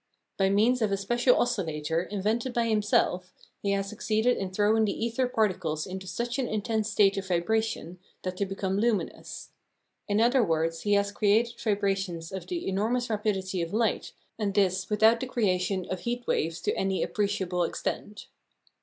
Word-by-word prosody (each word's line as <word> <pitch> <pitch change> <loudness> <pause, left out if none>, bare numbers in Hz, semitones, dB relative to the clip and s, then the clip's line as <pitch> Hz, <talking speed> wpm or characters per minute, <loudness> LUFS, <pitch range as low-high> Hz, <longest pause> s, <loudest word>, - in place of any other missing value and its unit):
By 195 -1 +2
means 225 +5 +3
of 215 -2 +1
a 195 - +1
special 240 +5 +2
oscillator, 160 -7 0
invented 215 +6 -1
by 235 -1 +2
himself, 205 -4 +1 0.3
he 200 - -1
has 195 0 -1
succeeded 220 +3 +1
in 195 - -3
throwing 210 +3 +2
the 220 +2 -1
ether 235 +2 0
particles 185 -10 0
into 190 0 -7
such 240 +6 -3
an 255 - 0
intense 215 0 -1
state 200 -1 +3
of 195 -1 -3
vibration 185 -1 -1 0.2
that 185 0 -4
they 200 - 0
become 195 0 -2
luminous. 225 -2 -2 0.6
In 205 +1 +1
other 245 +2 +4
words, 165 -2 0
he 205 - +1
has 200 0 +2
created 215 +3 +2
vibrations 195 -5 -1
of 190 -1 -6
the 350 -2 -3
enormous 225 +5 0
rapidity 195 -4 -1
of 170 +4 -3
light, 225 -1 0 0.3
and 200 -2 -1
this 190 -2 +2
without 220 +2 +4
the 260 - -3
creation 185 -5 0
of 185 - -2
heat 240 +3 -3
waves 165 +2 -1
to - - 0
any 195 0 0
appreciable 190 -4 -1
extent. 210 +4 -4
205 Hz, 170 wpm, -28 LUFS, 185-225 Hz, 0.6 s, other